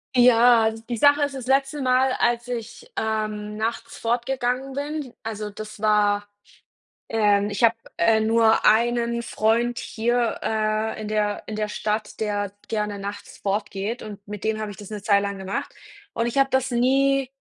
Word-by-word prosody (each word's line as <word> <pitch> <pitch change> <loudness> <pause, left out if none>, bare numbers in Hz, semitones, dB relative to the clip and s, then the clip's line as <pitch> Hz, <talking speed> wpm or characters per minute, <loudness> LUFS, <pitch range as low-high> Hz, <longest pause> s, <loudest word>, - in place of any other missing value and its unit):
Ja, 240 -2 +6
die 225 +2 -6
Sache 285 +4 +5
ist 285 - -1
das 260 -2 -7
letzte 270 +2 +1
Mal, 255 +1 +3
als 240 0 +1
ich, 245 - -6
ähm, 215 -1 -2
nachts 225 +2 -3
fortgegangen 250 +2 -1
bin, 285 -1 -4
also, 215 -1 -4
das 215 0 -9
war 205 -1 +2 0.8
ähm, 205 -2 +2
ich 205 +4 0
habe, 230 0 +6 0.2
äh, 225 -1 +3
nur 225 0 +3
einen 235 +1 +3
Freund 235 +1 +1
hier, 235 +1 0
äh, 215 0 -1
in 215 - -5
der 210 -1 0
in 215 - -4
der 215 0 -1
Stadt, 215 +1 -3
der 205 -2 -1 0.2
gerne 210 -2 -2
nachts 200 +1 -7
fortgeht 205 +3 -2
und 205 -1 -9
mit 210 -1 -7
dem 220 0 0
habe 215 -1 -4
ich 195 - -9
das 205 0 -10
'ne 210 -2 -6
Zeit 200 -2 +4
lang 200 0 -3
gemacht 190 +1 -4 0.4
und 230 0 0
ich 240 +4 -1
habe 270 0 +4
das 265 0 +1
nie 270 +2 +2
225 Hz, 170 wpm, -24 LUFS, 210-245 Hz, 0.8 s, Ja